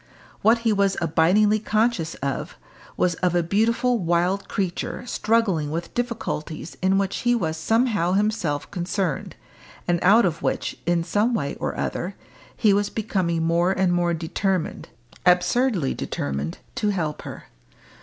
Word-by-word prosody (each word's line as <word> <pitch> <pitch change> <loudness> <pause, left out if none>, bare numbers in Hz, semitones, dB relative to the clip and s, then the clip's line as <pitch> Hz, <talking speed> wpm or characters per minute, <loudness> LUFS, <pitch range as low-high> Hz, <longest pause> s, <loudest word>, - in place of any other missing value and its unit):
What 225 +3 +5
he 225 - +4
was 200 -1 +1
abidingly 180 +6 +3
conscious 215 -7 +1
of, 140 -1 -3 0.4
was 180 - +2
of 180 -1 +2
a 175 - +3
beautiful 230 +6 +1
wild 175 +2 +1
creature 190 +4 -3
struggling 215 -11 +1
with 165 +3 -4
difficulties 215 -10 -4
in 190 +1 +3
which 195 0 0
he 240 0 +2
was 160 -8 -1
somehow 205 0 +1
himself 195 -8 0
concerned, 180 -4 -2 0.5
and 175 -1 +2
out 210 +5 +6
of 165 -3 -1
which, - - -1
in 170 -1 +2
some 215 +7 +1
way 140 -9 -2
or - - -3
other, 185 +2 -3 0.4
he 210 -2 +4
was 205 0 +1
becoming 185 -6 -1
more 170 +3 +2
and 190 -2 +1
more 175 -1 +1
determined 175 - -2 0.3
absurdly 180 - +2
determined 70 +3 -3 0.2
to 210 - +1
help 160 -7 -2
her. - - -9
185 Hz, 145 wpm, -24 LUFS, 170-215 Hz, 0.5 s, out